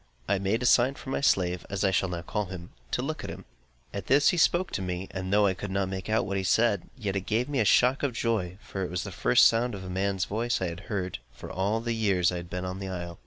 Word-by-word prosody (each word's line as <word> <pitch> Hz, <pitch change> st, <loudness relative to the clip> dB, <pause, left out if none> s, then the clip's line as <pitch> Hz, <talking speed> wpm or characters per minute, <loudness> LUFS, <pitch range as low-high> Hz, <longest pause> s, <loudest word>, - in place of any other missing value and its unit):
I 100 Hz, -1 st, +2 dB
made 100 Hz, +5 st, 0 dB
a -, -, 0 dB
sign 125 Hz, +3 st, +4 dB
for 130 Hz, -, -8 dB
my -, -, -1 dB
slave 90 Hz, -9 st, +2 dB
(as 100 Hz, 0 st, -2 dB
I 95 Hz, -, +3 dB
shall 95 Hz, 0 st, +1 dB
now 85 Hz, -1 st, -4 dB
call 105 Hz, +2 st, -2 dB
him) 90 Hz, -2 st, -8 dB, 0.2 s
to -, -, -1 dB
look -, -, -4 dB
at -, -, -5 dB
him. -, -, -8 dB, 0.5 s
At 100 Hz, -, -5 dB
this 140 Hz, +3 st, +5 dB
he -, -, +1 dB
spoke 175 Hz, +2 st, +3 dB
to -, -, -2 dB
me, 90 Hz, 0 st, -3 dB
and 95 Hz, 0 st, -4 dB
though 105 Hz, 0 st, +5 dB
I 95 Hz, -, +3 dB
could 100 Hz, +2 st, -6 dB
not 95 Hz, 0 st, -1 dB
make 95 Hz, +1 st, -5 dB
out 110 Hz, -, +2 dB
what 100 Hz, -2 st, -2 dB
he 95 Hz, -, -1 dB
said, 105 Hz, 0 st, +2 dB
yet 100 Hz, -5 st, -3 dB
it 95 Hz, -1 st, -3 dB
gave 115 Hz, +4 st, +1 dB
me 145 Hz, -2 st, -1 dB
a 110 Hz, -, +3 dB
shock 125 Hz, +6 st, +4 dB
of 140 Hz, -3 st, 0 dB
joy; 105 Hz, -6 st, -1 dB
for 95 Hz, -, -4 dB
it 90 Hz, -, -3 dB
was 90 Hz, +1 st, -2 dB
the -, -, -6 dB
first -, -, +4 dB
sound 115 Hz, 0 st, +3 dB
of 95 Hz, -, -7 dB
a 90 Hz, -, -6 dB
man's 95 Hz, 0 st, 0 dB
voice 115 Hz, +3 st, -1 dB
that 95 Hz, -, -2 dB
I -, -, -1 dB
had 85 Hz, +1 st, -7 dB
heard, 95 Hz, -, -2 dB
for -, -, -10 dB
all 100 Hz, +4 st, 0 dB
the 115 Hz, 0 st, -1 dB
years 100 Hz, -6 st, +2 dB
I 90 Hz, -, -3 dB
had 85 Hz, 0 st, -7 dB
been 90 Hz, +1 st, -4 dB
on 90 Hz, +1 st, -4 dB
the 95 Hz, -, -5 dB
isle. 85 Hz, -1 st, -6 dB
95 Hz, 295 wpm, -28 LUFS, 90-115 Hz, 0.5 s, this